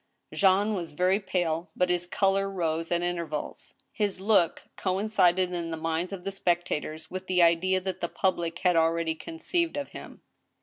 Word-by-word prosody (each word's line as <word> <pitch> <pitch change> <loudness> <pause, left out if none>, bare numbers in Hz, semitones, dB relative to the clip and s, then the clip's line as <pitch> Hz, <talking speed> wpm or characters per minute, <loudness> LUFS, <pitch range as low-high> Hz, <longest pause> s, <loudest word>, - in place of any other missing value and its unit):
Jean 200 +2 +3
was 175 -6 -4
very 185 +5 +2
pale, 175 -4 -1
but 180 0 +2
his 175 0 -1
color 195 +1 +1
rose 165 -3 -2
at 175 0 +1
intervals. 170 -4 -4 0.2
His 205 -4 -1
look 195 -4 +2
coincided 185 -2 +2
in 170 -1 -3
the 165 - -4
minds 165 +3 -2
of 190 -3 -6
the 195 - -3
spectators 170 -4 -2
with 185 0 -6
the 180 -1 +4
idea 175 +3 +3
that 190 0 -4
the 170 - -1
public 170 -3 -1
had 180 -1 +5
already 165 0 +2
conceived 330 - -2
of 285 - -3
him. - - -11
180 Hz, 170 wpm, -28 LUFS, 165-195 Hz, 0.2 s, had